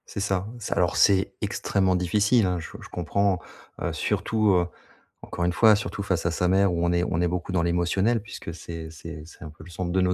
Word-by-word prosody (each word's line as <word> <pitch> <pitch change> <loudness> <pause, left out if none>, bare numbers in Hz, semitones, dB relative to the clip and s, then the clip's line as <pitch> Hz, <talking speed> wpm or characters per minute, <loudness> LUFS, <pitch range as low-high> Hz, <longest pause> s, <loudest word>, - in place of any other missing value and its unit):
C'est - - -3
ça. 95 -2 0
C'est 115 - -6
alors - - +2
c'est 95 -1 +4
extrêmement 95 -2 0
difficile 100 +6 +3
hein, 90 -1 0
je 80 - -7
je - - -11
comprends, 95 +3 0 0.4
heu, - - -2
surtout, 110 -2 +1
heu, 90 -1 +3 0.6
encore 85 - -3
une 90 - +2
fois, 110 +3 +6
surtout 105 -1 -4
face 90 -3 0
à - - +1
sa 90 +2 0
mère 95 0 +3
où 85 0 0
on 85 - +2
est 85 0 +2
on 80 - -1
est 90 - +2
beaucoup 90 +1 -3
dans 90 -2 +1
l'émotionnel 90 +6 +1
puisque 100 -5 -8
c'est 80 -1 -8
c'est 80 -1 -9
c'est 85 - -14
un 80 - -7
peu 80 - -14
le 90 - -13
centre 85 +1 -3
de 95 - +1
nos 90 0 +3
90 Hz, 235 wpm, -25 LUFS, 85-100 Hz, 0.6 s, fois